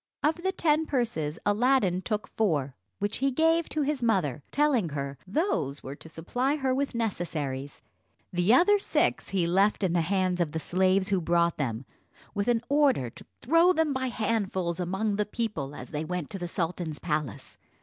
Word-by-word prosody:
Of 310 Hz, +2 st, +2 dB
the 380 Hz, +1 st, 0 dB
ten 320 Hz, -4 st, +1 dB
purses 170 Hz, -, -1 dB
Aladdin 205 Hz, -4 st, +2 dB
took 210 Hz, +1 st, -2 dB
four, 150 Hz, -11 st, 0 dB, 0.2 s
which 205 Hz, +1 st, -2 dB
he 275 Hz, +1 st, +1 dB
gave 325 Hz, +4 st, +2 dB
to 305 Hz, -, 0 dB
his 285 Hz, -1 st, -1 dB
mother, 185 Hz, -, +1 dB
telling 275 Hz, -, +2 dB
her, 140 Hz, -2 st, -5 dB
those 190 Hz, -, -1 dB
were 135 Hz, -, -6 dB
to 160 Hz, -, -13 dB
supply 245 Hz, -, -1 dB
her 265 Hz, -3 st, 0 dB
with 275 Hz, -1 st, -1 dB
necessaries; 150 Hz, -, -3 dB, 0.5 s
the 180 Hz, +3 st, +2 dB
other 365 Hz, +11 st, +5 dB
six -, -, 0 dB
he 190 Hz, -3 st, +1 dB
left 195 Hz, +4 st, +2 dB
in 180 Hz, -3 st, +1 dB
the 175 Hz, -, +3 dB
hands 185 Hz, +1 st, 0 dB
of 160 Hz, -3 st, -1 dB
the 160 Hz, -, -1 dB
slaves 190 Hz, +3 st, +1 dB
who 195 Hz, -3 st, +1 dB
brought 170 Hz, 0 st, +2 dB
them, 120 Hz, -3 st, -2 dB, 0.5 s
with 205 Hz, +1 st, -1 dB
an 235 Hz, -1 st, +2 dB
order 275 Hz, -, +2 dB
to -, -, -13 dB, 0.2 s
throw 330 Hz, +7 st, +5 dB
them 320 Hz, -4 st, +1 dB
by 260 Hz, 0 st, -1 dB
handfuls 200 Hz, -7 st, -1 dB
among 195 Hz, +4 st, -1 dB
the 210 Hz, -, +2 dB
people 205 Hz, -, -3 dB
as -, -, -9 dB
they 150 Hz, 0 st, -2 dB
went 175 Hz, -1 st, -4 dB
to 195 Hz, -, -5 dB
the 175 Hz, -, -3 dB
sultan's 170 Hz, -2 st, -3 dB
palace. 150 Hz, -, -4 dB
195 Hz, 180 wpm, -28 LUFS, 165-260 Hz, 0.5 s, other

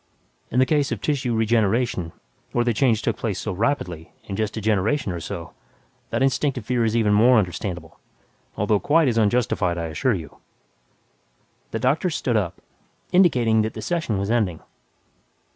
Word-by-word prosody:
In 120 Hz, -, -3 dB
the 130 Hz, -, +5 dB
case 145 Hz, 0 st, +1 dB
of -, -, -2 dB
tissue 135 Hz, -5 st, -1 dB
regeneration, 110 Hz, -4 st, +1 dB, 0.4 s
where 120 Hz, 0 st, +1 dB
the 120 Hz, -, +2 dB
change 115 Hz, -1 st, +2 dB
took -, -, -1 dB
place 105 Hz, -5 st, -3 dB
so 105 Hz, -, -3 dB
rapidly, 90 Hz, -, -2 dB
in 100 Hz, -, -6 dB
just 110 Hz, +1 st, -2 dB
a -, -, -1 dB
generation 110 Hz, +4 st, 0 dB
or 85 Hz, -, -4 dB
so, 85 Hz, 0 st, -7 dB, 0.6 s
that 115 Hz, +3 st, 0 dB
instinctive 135 Hz, -3 st, 0 dB
fear 125 Hz, 0 st, +1 dB
is 110 Hz, 0 st, 0 dB
even 105 Hz, -3 st, +3 dB
more 120 Hz, +4 st, +6 dB
understandable 90 Hz, -4 st, -3 dB, 0.6 s
although 105 Hz, 0 st, +2 dB
quite 155 Hz, +5 st, +3 dB
as 115 Hz, -2 st, +2 dB
unjustified, 105 Hz, -5 st, +1 dB
I 85 Hz, -1 st, -3 dB
assure 115 Hz, -, 0 dB
you." 80 Hz, -5 st, -8 dB, 1.3 s
The -, -, -3 dB
doctor 135 Hz, +10 st, +1 dB
stood 130 Hz, -6 st, -1 dB
up, 95 Hz, -6 st, -1 dB, 0.5 s
indicating 125 Hz, -, +4 dB
that 110 Hz, 0 st, -3 dB
the -, -, -5 dB
session 160 Hz, -, -1 dB
was 100 Hz, +3 st, -2 dB
ending. 100 Hz, -9 st, 0 dB
110 Hz, 165 wpm, -23 LUFS, 100-125 Hz, 1.3 s, more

